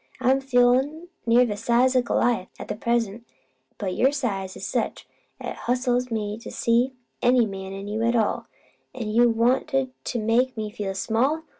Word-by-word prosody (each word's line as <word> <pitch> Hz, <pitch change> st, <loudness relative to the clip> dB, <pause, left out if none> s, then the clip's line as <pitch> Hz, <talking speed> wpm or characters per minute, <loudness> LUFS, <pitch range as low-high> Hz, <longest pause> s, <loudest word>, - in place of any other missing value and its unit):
I'm 260 Hz, +1 st, +3 dB
feelin' 265 Hz, +6 st, +2 dB, 0.2 s
near 240 Hz, +2 st, +6 dB
the 210 Hz, -3 st, -2 dB
size 245 Hz, +5 st, +2 dB
o' 255 Hz, -, +5 dB
Goliath 240 Hz, -4 st, +1 dB
at 210 Hz, -, -6 dB
present; 235 Hz, -2 st, 0 dB, 0.5 s
but 190 Hz, -3 st, -3 dB
your 260 Hz, +8 st, +3 dB
size 200 Hz, -10 st, -3 dB
is -, -, -6 dB
such -, -, -2 dB, 0.3 s
'at -, -, -5 dB
it -, -, -6 dB
hustles 250 Hz, 0 st, +1 dB
me 215 Hz, -1 st, -3 dB
to -, -, -9 dB
see 240 Hz, +3 st, +1 dB, 0.3 s
any 245 Hz, -1 st, +4 dB
MAN 190 Hz, -2 st, -6 dB
in 195 Hz, +1 st, -7 dB
you 215 Hz, +2 st, -2 dB
at 235 Hz, +1 st, +2 dB
all. 220 Hz, -3 st, 0 dB, 0.5 s
An' 230 Hz, -4 st, -4 dB
you 235 Hz, +2 st, +4 dB
wanted 260 Hz, +3 st, +1 dB
to 245 Hz, -, -2 dB
make 235 Hz, +3 st, +1 dB
me 215 Hz, -1 st, -3 dB
feel 205 Hz, -3 st, -4 dB
small! 255 Hz, +11 st, 0 dB
240 Hz, 175 wpm, -25 LUFS, 215-255 Hz, 0.5 s, near